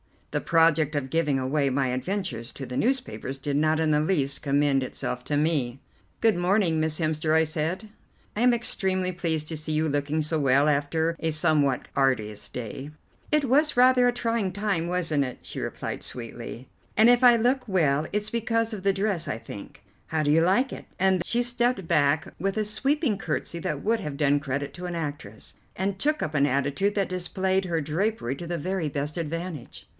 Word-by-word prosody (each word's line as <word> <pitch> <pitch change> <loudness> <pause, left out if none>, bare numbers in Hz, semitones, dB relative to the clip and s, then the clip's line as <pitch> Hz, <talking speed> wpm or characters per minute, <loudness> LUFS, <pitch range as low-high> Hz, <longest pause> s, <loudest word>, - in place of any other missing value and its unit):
The - - -1
project 160 -2 +3
of 140 -2 -2
giving 150 -2 +1
away 135 +2 +1
my 135 0 +1
adventures 130 - -3
to 135 - -7
the 125 0 -5
newspapers 250 - -1
did 140 +1 -2
not 155 +1 +2
in 160 -1 +2
the 150 - +3
least 145 -4 +1
commend 140 -1 +2
itself 125 -1 -4
to 145 - -1
me. 145 -5 0 0.4
"Good 225 -5 +3
morning, 175 -2 +2
Miss 155 -1 0
Hemster," 155 -1 0
I 160 0 +5
said, 160 +7 -3 0.5
"I 215 - -1
am 245 0 +5
extremely 190 -5 0
pleased 160 -4 -2
to 160 - -1
see 155 +1 -2
you 155 +1 +1
looking 145 +2 0
so 155 +1 0
well 140 +1 +4
after 160 +3 0
a 160 - 0
somewhat 150 -4 +1
arduous 110 -6 0
day." 125 +4 -7 0.4
"It 300 -1 +2
was 290 +4 +3
rather 250 0 +6
a 245 - +2
trying 230 -5 -1
time, 200 -4 -1
wasn't 165 -5 0
it?" 125 - -7
she - - -7
replied - - -4
sweetly, 120 +1 -6 0.3
"and 220 +2 +6
if 245 +1 +4
I 240 -1 +8
look 250 +3 +1
well 155 -6 +2
it's 210 0 -1
because 230 -1 0
of 200 -3 -6
the 195 0 +3
dress, 195 -4 -1
I 125 - -2
think. 105 -3 -10 0.2
How 160 -1 0
do 145 - +2
you 160 +2 +5
like 200 +10 +2
it?" - - -8
and 190 -1 +2
she 240 +1 +1
stepped 240 -6 0
back 150 -2 +2
with 195 +3 -1
a 215 - +1
sweeping 265 +2 +1
curtesy 170 0 -3
that 150 -2 -3
would 225 +1 +1
have 145 -2 -5
done 145 -1 +3
credit 140 0 -3
to 180 0 -7
an 175 -1 -4
actress, 145 -10 -6 0.2
and 190 +1 -2
took 305 +1 +1
up 155 - -3
an 140 -2 +3
attitude 140 +9 0
that 200 -2 0
displayed 190 +1 -1
her 165 -2 -1
drapery 155 - -1
to 170 - -7
the 170 0 -2
very 185 +1 -2
best 145 +2 -3
advantage. 165 -3 -5
160 Hz, 195 wpm, -26 LUFS, 145-195 Hz, 0.5 s, I